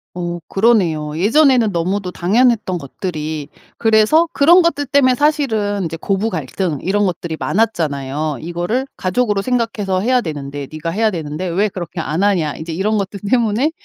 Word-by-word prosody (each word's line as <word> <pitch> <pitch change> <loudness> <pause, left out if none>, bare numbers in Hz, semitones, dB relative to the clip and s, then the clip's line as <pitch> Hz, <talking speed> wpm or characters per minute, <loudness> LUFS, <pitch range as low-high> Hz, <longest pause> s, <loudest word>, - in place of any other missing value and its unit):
어 175 -1 -4
그러네요. 175 -9 +1
예전에는 240 - +4
너무도 180 +2 -2
당연했던 210 0 +2
것들이 155 -1 -5 0.3
그래서 225 +9 +4
그런 345 +6 +6
것들 290 -4 0
때문에 265 -2 +4
사실은 220 - 0
이제 165 0 -4
고부 195 +5 -1
갈등 160 0 -3
이런 205 +2 +1
것들이 170 -3 -3
많았잖아요. 150 - -1
이거를 175 - -2
가족으로 205 +2 0
생각해서 225 -6 -1
해야 250 +3 +2
되는데 145 -4 -6
"네가 155 +1 -4
해야 215 +5 +1
되는데 160 +1 -4
왜 190 +5 +1
그렇게 175 -2 -6
안 160 +4 -1
하냐." 175 -8 +1
인제 160 +1 -6
이런 210 +5 0
것들 200 0 -3
때문에 240 +4 +2
195 Hz, 375 characters per minute, -18 LUFS, 165-225 Hz, 0.3 s, 그런